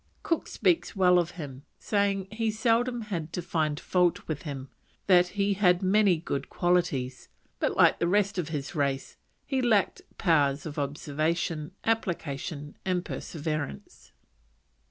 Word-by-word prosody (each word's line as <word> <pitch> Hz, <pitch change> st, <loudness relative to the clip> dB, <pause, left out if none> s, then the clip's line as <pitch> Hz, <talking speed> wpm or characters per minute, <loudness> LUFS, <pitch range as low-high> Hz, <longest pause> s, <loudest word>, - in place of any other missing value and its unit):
Cook 330 Hz, -, 0 dB
speaks 185 Hz, +1 st, +1 dB
well 180 Hz, -2 st, +5 dB
of 175 Hz, 0 st, -1 dB
him, 140 Hz, -5 st, -7 dB, 0.2 s
saying 200 Hz, -2 st, 0 dB
he 225 Hz, 0 st, -1 dB
seldom 235 Hz, +2 st, +1 dB
had 175 Hz, -7 st, -4 dB
to 180 Hz, -, -2 dB
find 155 Hz, -3 st, -1 dB
fault 180 Hz, -2 st, +1 dB
with 155 Hz, -3 st, -3 dB
him, 135 Hz, -4 st, -6 dB, 0.4 s
that 180 Hz, -2 st, +5 dB
he 200 Hz, 0 st, +2 dB
had 180 Hz, -2 st, +3 dB
many 195 Hz, -1 st, +4 dB
good 140 Hz, -4 st, -4 dB
qualities, 170 Hz, -8 st, 0 dB, 0.3 s
but, -, -, 0 dB
like -, -, +5 dB
the 170 Hz, -, +1 dB
rest 200 Hz, +1 st, +2 dB
of 165 Hz, -3 st, -2 dB
his 145 Hz, -3 st, -4 dB
race, 140 Hz, -3 st, -1 dB, 0.3 s
he 265 Hz, -2 st, 0 dB
lacked 220 Hz, -5 st, +2 dB, 0.2 s
powers 145 Hz, -5 st, +2 dB
of 150 Hz, -2 st, -5 dB
observation, 155 Hz, +3 st, -2 dB
application, 160 Hz, -8 st, -2 dB
and 180 Hz, -1 st, -1 dB
perseverance. 155 Hz, -, -5 dB
175 Hz, 140 wpm, -28 LUFS, 150-200 Hz, 0.4 s, well